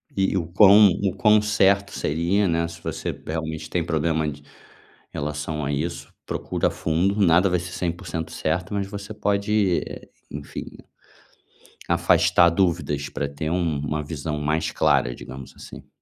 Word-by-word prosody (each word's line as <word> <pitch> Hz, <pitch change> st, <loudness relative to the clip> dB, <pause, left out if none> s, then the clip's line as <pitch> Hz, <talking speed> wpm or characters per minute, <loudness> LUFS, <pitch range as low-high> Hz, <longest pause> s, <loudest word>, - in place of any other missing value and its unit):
E 95 Hz, 0 st, +1 dB
o 85 Hz, -, -1 dB
quão 100 Hz, +3 st, +7 dB
o 95 Hz, -2 st, 0 dB
quão 105 Hz, +2 st, +4 dB
certo 100 Hz, -1 st, +2 dB
seria, 85 Hz, +6 st, 0 dB
né, 85 Hz, -1 st, 0 dB
se 85 Hz, 0 st, -11 dB
você -, -, -3 dB
realmente 80 Hz, -1 st, -4 dB
tem 90 Hz, -, 0 dB
problema 80 Hz, -1 st, 0 dB
d 70 Hz, 0 st, -9 dB, 0.7 s
em -, -, -7 dB
relação 75 Hz, +1 st, -3 dB
a 70 Hz, -, -1 dB
isso, 85 Hz, +4 st, -4 dB
procura -, -, -1 dB
fundo, 85 Hz, +5 st, 0 dB
nada 90 Hz, 0 st, +4 dB
vai 90 Hz, 0 st, +1 dB
ser 90 Hz, +1 st, -7 dB
100% 85 Hz, -2 st, -4 dB
certo, 90 Hz, +5 st, -2 dB
mas 100 Hz, -1 st, -1 dB
você 100 Hz, +1 st, -7 dB
pode, 100 Hz, -2 st, +1 dB, 0.5 s
enfim, 75 Hz, 0 st, -7 dB, 1.2 s
afastar 85 Hz, -1 st, +4 dB
dúvidas 85 Hz, -5 st, 0 dB
pra 70 Hz, -, -3 dB
ter 75 Hz, +2 st, -4 dB
um 85 Hz, -4 st, 0 dB
uma 75 Hz, +1 st, -2 dB
visão 75 Hz, 0 st, -4 dB
mais 75 Hz, +2 st, -1 dB
clara, -, -, +2 dB
digamos 65 Hz, +2 st, -10 dB
assim. -, -, -12 dB
85 Hz, 150 wpm, -23 LUFS, 75-95 Hz, 1.2 s, quão